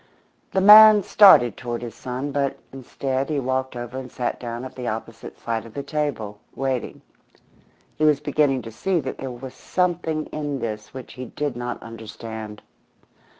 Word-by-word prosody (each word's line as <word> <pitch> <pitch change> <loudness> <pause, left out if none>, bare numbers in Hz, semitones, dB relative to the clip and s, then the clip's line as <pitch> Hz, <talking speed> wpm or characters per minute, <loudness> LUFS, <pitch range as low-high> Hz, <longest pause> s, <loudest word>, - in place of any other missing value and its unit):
The 190 - 0
man 210 +1 +9
started 185 - +6
toward 120 -1 -5
his 115 -2 -6
son, 130 +4 -5
but 140 -1 -1 0.2
instead 135 +1 -3
he 150 -2 0
walked 130 0 -2
over 120 +2 -5
and 130 -1 -9
sat 125 - -3
down 120 +1 -5
at 130 - -9
the 125 -2 -5
opposite 115 0 -6
side 115 -1 -3
of 115 - -14
the 140 - -4
table, 140 -9 -3 0.2
waiting. 130 -2 -3 1.0
He - - 0
was 150 -2 +4
beginning 145 -3 +1
to 115 - -8
see 175 - -1
that 130 -3 -5
there 135 - -4
was 125 +1 -8
something 170 -4 -1
in 145 -2 -3
this 105 -4 -5
which 130 -1 -9
he 130 0 -7
did 145 +1 -4
not 120 0 -4
understand. 110 -1 -8
130 Hz, 170 wpm, -23 LUFS, 120-145 Hz, 1.0 s, man